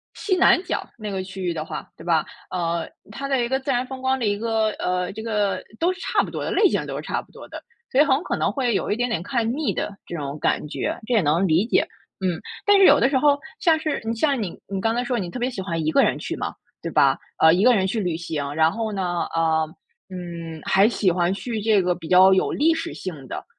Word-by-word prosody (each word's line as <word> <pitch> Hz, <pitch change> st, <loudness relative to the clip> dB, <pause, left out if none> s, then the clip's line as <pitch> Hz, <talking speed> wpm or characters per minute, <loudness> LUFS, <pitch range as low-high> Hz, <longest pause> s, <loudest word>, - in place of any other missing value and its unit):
西 380 Hz, -3 st, 0 dB
南 365 Hz, 0 st, +5 dB
角 365 Hz, -, -3 dB
那 210 Hz, -2 st, -5 dB
个 190 Hz, -1 st, -3 dB
区 190 Hz, 0 st, -7 dB
域 175 Hz, -1 st, 0 dB
的 155 Hz, -1 st, -3 dB
话， 155 Hz, -1 st, -7 dB
对 -, -, -13 dB
吧？ 165 Hz, -2 st, +2 dB, 0.2 s
呃， 170 Hz, -2 st, -2 dB, 0.2 s
它 275 Hz, +6 st, -5 dB
的 265 Hz, -3 st, +1 dB
一 -, -, -2 dB
个 265 Hz, +1 st, 0 dB
自 270 Hz, +1 st, -7 dB
然 250 Hz, 0 st, 0 dB
风 260 Hz, 0 st, -8 dB
光 260 Hz, 0 st, +1 dB
的 235 Hz, -, -1 dB
一 205 Hz, -1 st, +1 dB
个 220 Hz, -1 st, +1 dB
呃， 180 Hz, 0 st, -1 dB
这 220 Hz, -, -7 dB
个 210 Hz, -3 st, -1 dB, 0.2 s
都 355 Hz, +2 st, +2 dB
是 370 Hz, -, -14 dB
差 -, -, +1 dB
不 -, -, -6 dB
多 -, -, -4 dB
的， -, -, -3 dB
类 415 Hz, -, +5 dB
型 -, -, -1 dB
都 -, -, -5 dB
是 -, -, -4 dB
差 -, -, -2 dB
不 -, -, -22 dB
多 -, -, -12 dB
的。 -, -, -9 dB, 0.3 s
所 265 Hz, -, +5 dB
以 -, -, +8 dB
很 285 Hz, +2 st, +2 dB
可 -, -, -2 dB
能 -, -, 0 dB
会 250 Hz, -5 st, 0 dB
有 -, -, -1 dB
一 -, -, +2 dB
点 245 Hz, +2 st, 0 dB
点 220 Hz, -9 st, -2 dB
看 235 Hz, +3 st, -1 dB
腻 305 Hz, -1 st, -1 dB
的 205 Hz, -, -3 dB
这 170 Hz, -, -5 dB
种 145 Hz, 0 st, -5 dB
感 -, -, 0 dB
觉， -, -, -3 dB
这 245 Hz, -, -1 dB
也 220 Hz, -, +4 dB
能 165 Hz, +5 st, +2 dB
理 170 Hz, +6 st, +2 dB
解， -, -, +3 dB, 0.4 s
嗯。 180 Hz, -4 st, -1 dB, 0.2 s
但 410 Hz, -1 st, +6 dB
是 390 Hz, -, +7 dB
有 290 Hz, -, +7 dB
的 240 Hz, -, +4 dB
时 270 Hz, -1 st, +2 dB
候 285 Hz, 0 st, +4 dB, 0.2 s
像 325 Hz, -2 st, +4 dB
是 310 Hz, -1 st, -2 dB
嗯， 225 Hz, +1 st, -1 dB
像 275 Hz, 0 st, +1 dB
你 185 Hz, -, -5 dB
你 195 Hz, -1 st, -3 dB
刚 225 Hz, +2 st, +1 dB
才 245 Hz, -, 0 dB
说 245 Hz, -1 st, -1 dB
你 180 Hz, -3 st, -4 dB
特 175 Hz, -, -6 dB
别 245 Hz, 0 st, 0 dB
喜 205 Hz, -, -5 dB
欢 165 Hz, -4 st, -3 dB
一 155 Hz, -, +1 dB
个 -, -, +4 dB
人 -, -, +2 dB
去 -, -, -4 dB
嘛， -, -, -4 dB, 0.3 s
对 -, -, -4 dB
吧？ -, -, +4 dB, 0.2 s
呃， 160 Hz, 0 st, +6 dB
一 185 Hz, +4 st, +2 dB
个 250 Hz, -1 st, +6 dB
人 190 Hz, -3 st, +2 dB
去 195 Hz, +4 st, -1 dB
旅 175 Hz, -5 st, -1 dB
行， 155 Hz, -4 st, -4 dB
然 160 Hz, +1 st, +4 dB
后 225 Hz, +1 st, -3 dB
呢， 180 Hz, -3 st, -2 dB
呃， 160 Hz, -1 st, +2 dB, 0.5 s
嗯， 170 Hz, -3 st, -7 dB
还 195 Hz, +3 st, +4 dB
喜 200 Hz, -6 st, +1 dB
欢 175 Hz, +1 st, +1 dB
去 225 Hz, +1 st, -4 dB
这 210 Hz, -3 st, +3 dB
个 180 Hz, 0 st, +2 dB
比 170 Hz, -2 st, -9 dB
较 185 Hz, +2 st, +7 dB
有 190 Hz, -, +2 dB
历 320 Hz, +3 st, +3 dB
史 330 Hz, +1 st, -4 dB
性 155 Hz, -8 st, -7 dB
的。 -, -, -6 dB
205 Hz, 295 characters per minute, -23 LUFS, 175-250 Hz, 0.5 s, 以